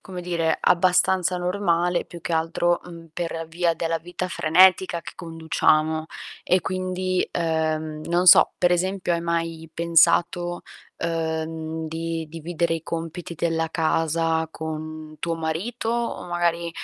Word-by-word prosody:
come 185 -2 -8
dire, 170 -2 0
abbastanza 180 0 +3
normale, 180 -1 0
più 175 - -11
che 170 - -4
altro, 165 +2 +1
mhmm, 170 -1 -11
per 165 -1 -4
via 170 +1 +1
della 165 0 -1
vita 175 +2 -5
frenetica 180 +1 +4
che - - -9
conduciamo. 160 -1 0 0.4
E 185 - +2
quindi, 185 +1 -1
ehm, 155 -2 -1
non 175 +2 +1
so, 180 - +8
per 175 0 +3
esempio 185 0 0
hai 170 - 0
mai 165 -1 -3
pensato, 175 +1 +2 0.4
uhm, 160 -1 -3
di 165 0 -4
dividere 165 +1 -2
i 165 - -5
compiti 165 +1 -5
della 165 -1 -1
casa 160 0 0
con 155 -1 -7
tuo 170 -1 -2
marito 170 +9 -3
o 235 -4 -2
magari, 170 -1 0
165 Hz, 130 wpm, -24 LUFS, 160-175 Hz, 0.4 s, so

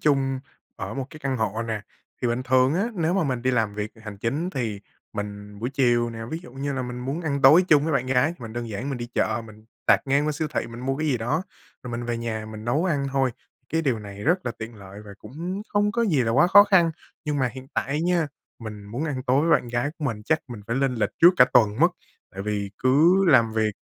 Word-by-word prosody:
chung 135 -3 +1 0.4
ở - - -5
một 135 -2 -3
cái 155 - -11
căn 135 -2 -1
hộ 110 -1 -1
nè. 110 -2 -3 0.4
Thì 125 - +2
bình 120 +2 -1
thường 130 +2 +3
á, 195 +6 +1
nếu 170 -2 0
mà 195 - +2
mình 130 -4 -2
đi 130 - +2
làm 110 -4 0
việc 105 +1 -3
hành 105 -2 -8
chính 140 - -2
thì 115 - -3 0.3
mình 105 0 -6
buổi 120 +4 -3
chiều 120 -3 +2
nè, 115 - -8
ví 160 - -3
dụ 175 - -13
như 140 +2 -3
là 135 -1 -2
mình 125 0 -5
muốn 135 +6 -3
ăn 140 -4 -2
tối 155 +8 +8
chung 150 -2 +5
với 160 - 0
bạn 130 -2 +1
gái 130 +3 +3
thì 175 - -14
mình 110 -1 -7
đơn 120 0 -4
giản 110 +5 -4
mình 135 - -3
đi 120 - -4
chợ, 110 +1 0
mình 110 0 -15 0.2
tạt - - +6
ngang 140 +2 +2
qua 155 - +1
siêu 155 +1 -2
thị - - 0
mình 115 +1 -9
mua 135 +1 -1
cái 155 +2 -2
gì 135 - +2
đó, 125 +9 -1 0.4
rồi 125 - -7
mình 120 0 -4
về 120 0 -2
nhà 110 -2 -4
mình 110 0 -8
nấu 140 +9 +1
ăn 145 -6 0
thôi, 135 -2 +2 0.4
cái 165 0 0
điều 130 -7 +1
này 100 -1 -9
rất 175 -1 +1
là 120 - -1
tiện 110 +1 -7
lợi 100 -1 -11
và 105 - -11
cũng 170 - -6
hông 205 0 +3
có 235 0 +1
gì 155 - +2
là 115 - 0
quá 145 +8 +5
khó 205 +3 +8
khăn. 185 -5 +4 0.3
Nhưng 150 -2 -1
mà 130 - +2
hiện 130 0 -10
tại - - -1
á 140 +2 0
nha, 175 -2 +2 0.3
mình 105 -3 -8
muốn 120 +9 -4
ăn 140 -5 -3
tối 130 +3 +4
với 165 - +1
bạn 120 - -11
gái 120 +4 -1
của 155 - -4
mình 110 -6 -2
chắc 160 +5 +2
mình 120 -4 -7
phải 115 - -1
lên 135 -1 +1
lịch 115 - 0
trước 175 - +9
cả 125 - +8
tuần 110 -3 +4
mất. - - +6 0.4
Tại 95 - -6
vì 100 -1 -2
cứ 160 +9 +4
làm 120 -8 +5
việc 110 -1 +1
130 Hz, 270 wpm, -25 LUFS, 115-150 Hz, 0.4 s, trước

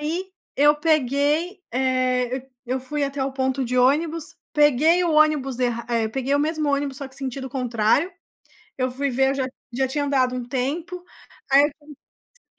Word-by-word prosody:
aí 345 +5 -3 0.2
eu 295 +2 +5
peguei, 300 +4 +1
eh 255 0 0 0.2
eu 255 +2 -1
fui 290 +3 -2
até 275 0 -3
o 270 - -3
ponto 265 0 -1
de 250 +1 -2
ônibus. 310 +5 +1 0.2
Peguei 300 +4 +4
o 335 - +1
ônibus 300 -4 +3
erra 240 -2 -1
eh, 230 -2 0
peguei 265 +4 -1
o - - +3
mesmo 310 0 0
ônibus, 280 -1 -1
só 275 - -6
que 265 - -19
sentido 265 0 -5
o - - -9
contrário. 250 - +1 0.7
Eu 255 0 0
fui 280 +3 -2
ver, 265 +2 +2
eu 275 - -1
já 270 - -1 0.3
já 265 +1 +1
tinha 285 +2 -1
andado 260 -3 +1
um 250 - -4
tempo. 320 +8 -3 0.5
Aí 275 +1 +8 0.8
eu - - -67
275 Hz, 175 wpm, -23 LUFS, 255-300 Hz, 0.8 s, Aí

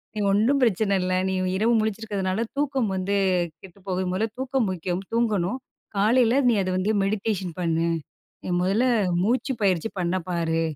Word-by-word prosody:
நீ - - -3
ஒண்ணும் 230 +8 +3
பிரச்சனை 215 -3 +2
இல்லை. 185 0 0
நீ - - -1 0.2
இரவு 230 +3 +2
முழிச்சிருக்கிறதுனால, 210 -2 -2 0.2
தூக்கம் 270 -6 0
வந்து 190 +2 -1 0.5
கெட்டு 190 0 -14
போகுது. 185 0 -1
முதல்ல 210 +5 0
தூக்கம் 260 -3 0
முக்கியம், 180 +1 -3
தூங்கணும். 225 -1 0 0.4
காலைல, 230 +4 +4
நீ 235 - +4
அத 185 - -2
வந்து 190 +3 +1
மெடிடேஷன் 195 -3 -1
பண்ணு. 165 -1 +1 0.6
நீ - - -5
முதல்ல 195 +7 +2 0.4
மூச்சு 250 +7 +1
பயிற்சி 185 -1 +2
பண்ண 180 0 0
பாரு. 165 -2 0
200 Hz, 150 wpm, -24 LUFS, 185-225 Hz, 0.6 s, காலைல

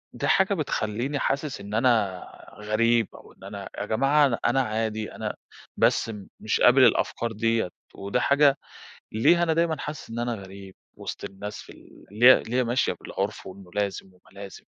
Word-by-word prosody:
ده - - -2
حاجة 190 +1 +3
بتخلّيني 135 - -2
حاسس 140 -5 -2
إن 100 +1 -9
أنا 110 -6 +2 0.4
غريب 115 +1 +2
أو - - -15
إن - - -20
أنا 100 0 -8
يا - - -3
جماعة 135 +7 +3
أنا 120 -4 -2
أنا 135 - +3
عادي 110 -2 -2
أنا - - -4 0.4
بس 115 - +2 0.3
مش 110 - -1
قابل 130 +2 +6
الأفكار 115 0 +1
ديّة 115 -2 0 0.3
وده 100 +5 -2
حاجة 140 0 +4 0.5
ليه 170 +11 +3
أنا 165 -2 +2
دايمًا 165 -1 +1
حاسس 150 -1 -7
إن 115 +1 -5
أنا 120 -1 -1
غريب 95 -1 -11 0.2
وسط - - -7
الناس 105 +2 -7
في - - -14
ال - - -17
اللي 120 +5 +7
اللي 115 - -5
هي 130 - +3
ماشية 120 +3 0
بالعُرف 100 +2 -4
وإنه 95 -1 -12
لازم 100 -2 -2
وإنه 90 - -26 0.2
لازم؟ 100 -2 -10
115 Hz, 175 wpm, -25 LUFS, 105-135 Hz, 0.5 s, اللي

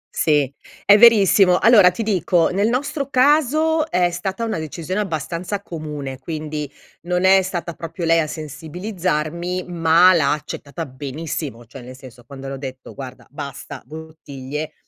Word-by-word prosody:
Sì, 145 -3 +2 0.3
è 205 - +8
verissimo. 200 -5 +6
Allora 210 -4 +6
ti 180 +5 -4
dico, 180 -5 +1
nel 200 +4 +1
nostro 275 +3 -2
caso 305 +4 +2
è 180 -6 +1
stata 190 +5 -4
una 225 - -2
decisione 165 +5 -4
abbastanza 175 +2 -4
comune. 150 -6 -6
Quindi 150 0 -5 0.4
non 180 +1 0
è 190 0 +6
stata 175 -2 -4
proprio 165 +1 -6
lei 165 0 +4
a 155 - 0
sensibilizzarmi, 170 +2 -4
ma 170 +1 +5
l'ha 150 -5 +2
accettata 150 +2 -6
benissimo, 135 -2 -6
cioè 130 +3 -12
nel 125 +1 -11
senso, 125 -2 -14
quando 135 +1 -10
le 135 - -5
ho - - -5
detto: 130 -1 -8
"Guarda 130 -2 -9
basta 140 -2 -8
bottiglie, 150 -2 -7
165 Hz, 150 wpm, -20 LUFS, 145-190 Hz, 0.4 s, è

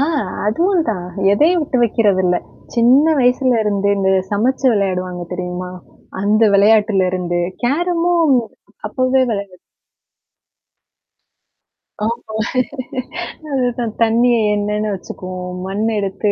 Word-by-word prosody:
ஆ - - +3 0.4
அதுவும் 340 - +1
தான், 180 -5 -2 0.3
எதையும் 325 - +3
விட்டு 265 -4 -1
வைக்குறதில்ல. 195 -6 +2 0.4
சின்ன 245 +5 +5 0.2
வயசுலருந்து, 230 -6 +2
இந்த 190 -1 +1 0.2
சமச்சு 245 +6 0
விளையாடுவாங்க 185 -3 -2
தெரியுமா? 180 0 -5 0.5
அந்த 215 +2 +2
விளையாட்டுலருந்து, 190 -4 +2 0.2
கேரமும் 335 +2 +2 0.5
அப்வே 255 +3 +1
விளான்டது. 200 -4 -5 2.5
ஆமா 230 -1 -4 1.2
அதுதான், 245 -4 -1
தண்ணிய 235 +2 +3 0.2
எண்ணன்னு 210 +1 -1
வச்சுக்குவோம், 185 -1 -7
மண்ண 205 +3 -1
எடுத்து 200 +1 -1
215 Hz, 90 wpm, -18 LUFS, 190-250 Hz, 2.5 s, சின்ன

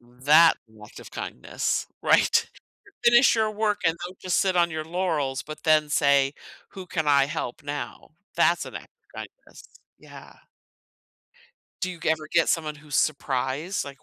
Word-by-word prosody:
That 135 +7 +4 0.3
act - - -13
of - - -12
kindness. 60 - -3 0.2
Right? - - +3 0.6
Finish 240 +1 +6
your 220 -1 +1
work 215 -1 -1
and 165 0 +2
don't 185 +1 -9
just 185 -1 0
sit 190 -2 +1
on 170 -1 +3
your 155 0 -4
laurels, 160 -6 -2
but 155 0 -10
then 155 -1 +3
say, 140 -1 +3 0.4
"Who 190 -2 -9
can 160 -3 -2
I 140 -1 +4
help 145 -3 -5
now?" 145 +1 -6 0.2
That's 170 0 +2
an - - -10
act - - -9
of - - -47
kindness. - - -13 0.4
Yeah. - - -14 1.4
Do 185 - -1
you 175 - -9
ever 160 -1 0
get 170 -1 +3
someone 155 -2 -1
who's 150 -1 -5
surprised? 145 +4 -1
Like, 140 -1 -11
155 Hz, 160 wpm, -25 LUFS, 140-180 Hz, 1.4 s, Finish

